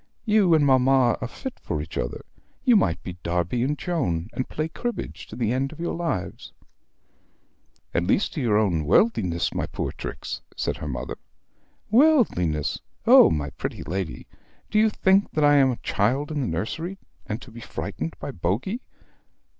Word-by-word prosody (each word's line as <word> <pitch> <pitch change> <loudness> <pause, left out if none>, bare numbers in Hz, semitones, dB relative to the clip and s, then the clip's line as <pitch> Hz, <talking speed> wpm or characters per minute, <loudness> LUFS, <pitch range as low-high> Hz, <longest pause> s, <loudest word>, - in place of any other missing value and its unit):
You 210 -6 +4
and 150 -2 +4
mamma 130 -2 +4
are 125 - -2
fit 260 - -7
for 75 - -3
each 75 +2 -7
other. - - -3 0.4
You 245 -3 +6
might 85 - +2
be 90 -1 -7
Darby 90 +7 -1
and 145 +4 0
Joan, 110 - -2
and 130 - -3
play 155 +1 -2
cribbage 240 +9 -5
to - - -9
the 115 -2 0
end 135 +2 -1
of 155 - -12
your 170 - -2
lives." 165 - -3 1.4
"At 85 - +1
least 195 - +1
you 120 -9 +2
own 105 -3 +3
to 85 - +1
your 80 - -2
worldliness, 90 - +2
my - - -2
poor - - -3
Trix," - - -6 0.2
says - - -1
her 80 - -6
mother. 65 -1 -4 0.7
"Worldliness. 215 - +3 0.3
Oh, - - +8
my 75 -3 -2
pretty - - -5
lady! 90 -1 -4 0.5
Do 215 - +3
you 220 0 +5
think 195 -1 +3
that 155 - +1
I 145 0 +6
am 135 -1 +5
a 125 - -1
child 130 +9 0
in 150 -2 -1
the 130 - -1
nursery, 160 - -3 0.3
and 110 +1 -3
to 125 - -13
be 115 +1 -10
frightened 80 -6 -5
by - - -5
Bogey! 115 - -2
125 Hz, 180 wpm, -25 LUFS, -, 1.4 s, Oh